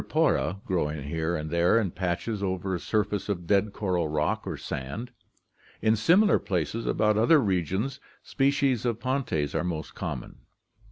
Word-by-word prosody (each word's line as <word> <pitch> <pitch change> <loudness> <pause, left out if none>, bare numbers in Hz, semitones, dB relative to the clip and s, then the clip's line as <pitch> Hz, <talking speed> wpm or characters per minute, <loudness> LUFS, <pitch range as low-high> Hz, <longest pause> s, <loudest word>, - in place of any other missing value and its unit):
cribripora), 90 +5 0
growing 75 -5 -1
here 80 +4 -2
and 75 -1 -4
there 85 +6 +4
in 100 -6 -1
patches 95 +4 -2
over 95 0 -2
a 90 - -1
surface 105 0 -1
of 90 -4 -2
dead 100 +3 +2
coral 90 -5 -1
rock 75 0 -1
or - - -3
sand. 105 - -5 0.7
In 110 +1 +3
similar 180 - +4
places 90 +5 -2
about 105 0 +2
other 120 +9 +6
regions 95 - -1 0.2
species 135 -3 +1
of 120 -2 -1
Pontes 130 - -1
are - - 0
most 85 -3 -4
common.' - - -6
100 Hz, 155 wpm, -27 LUFS, 85-115 Hz, 0.7 s, other